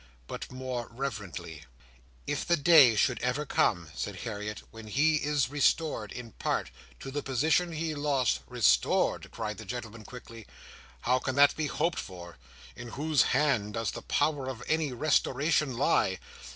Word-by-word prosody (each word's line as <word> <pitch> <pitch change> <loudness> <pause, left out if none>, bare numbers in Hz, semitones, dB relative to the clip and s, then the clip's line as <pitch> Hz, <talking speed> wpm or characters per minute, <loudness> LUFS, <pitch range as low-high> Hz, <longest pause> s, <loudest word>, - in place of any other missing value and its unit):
But - - -7
more 125 -2 -4
reverently. 95 - -6 0.6
"If 145 - -2
the 170 0 +2
day 145 -6 +7
should 120 +4 +1
ever 125 +5 -1
come," 85 - +1
said 100 +2 -4
Harriet, 105 -2 -5
"when 115 -1 -11
he 155 +8 +3
is 145 -3 0
restored, 145 -6 +1
in 120 -2 -8
part, - - -2 0.3
to 135 - -6
the 145 +1 -2
position 160 +6 +1
he 160 0 -2
lost—" 145 -4 +1
"Restored!" 65 0 +2
cried 110 -2 -5
the - - -7
gentleman, 115 0 -7
quickly. 115 -2 -11 0.5
"How 125 +1 +2
can 130 0 -3
that 140 0 +6
be 155 -1 -1
hoped 165 +4 -1
for? 85 -6 -9 0.4
In 120 - -8
whose 150 +4 +1 0.2
hands 125 -9 +1
does 115 -3 -2
the - - -7
power 145 -4 0
of 125 -2 -7
any 160 -3 +1
restoration 140 0 +1
lie? 95 -7 +2
130 Hz, 155 wpm, -29 LUFS, 110-145 Hz, 0.6 s, day